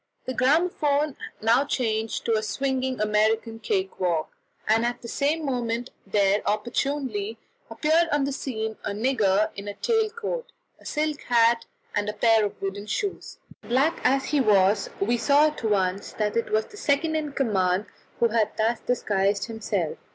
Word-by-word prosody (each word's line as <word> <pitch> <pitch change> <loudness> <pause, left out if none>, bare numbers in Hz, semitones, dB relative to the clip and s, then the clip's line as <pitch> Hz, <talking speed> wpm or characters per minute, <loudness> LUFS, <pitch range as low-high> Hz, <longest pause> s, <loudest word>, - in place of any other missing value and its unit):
The 255 - -3
gramophone 295 +1 +2 0.3
now 235 +4 +4
changed 225 -5 -1
to 230 - +2
a 215 - +2
swinging 260 +4 -1
American 220 +2 +1
cake 390 - -2
walk, 170 -4 0 0.4
and 220 +2 +3
at 240 +1 -2
the - - -6
same 295 +6 0
moment 240 -2 -2 0.2
there 200 +1 +2
opportunely 225 -1 -2 0.3
appeared 315 +9 +2
on 290 -1 +2
the 280 - -1
scene 220 -5 -4
a - - -2
nigger 215 -3 +2
in 200 0 -7
a 205 - -5
tail 445 - +1
coat, 470 +2 -5 0.3
a - - -20
silk 305 -1 -1
hat, 230 -1 +3 0.3
and 205 0 0
a - - -3
pair 225 0 +4
of 205 - -3
wooden 200 +1 -4
shoes. 390 - -3 0.2
Black 270 +7 +1
as 270 +1 +2
he 295 -2 +1
was, 200 -3 +3
we 235 +5 +1
saw 285 +5 +4
at 300 -5 -2
once 195 -3 0
that 210 -1 -1
it 230 - 0
was 215 0 +2
the 415 - -14
second 315 -1 +1
in 300 -2 -2
command 195 -7 +1 0.3
who 235 - +4
had 215 -1 0
thus 225 +2 +1
disguised 200 -4 0
himself. 205 -7 -3
230 Hz, 165 wpm, -25 LUFS, 210-280 Hz, 0.4 s, now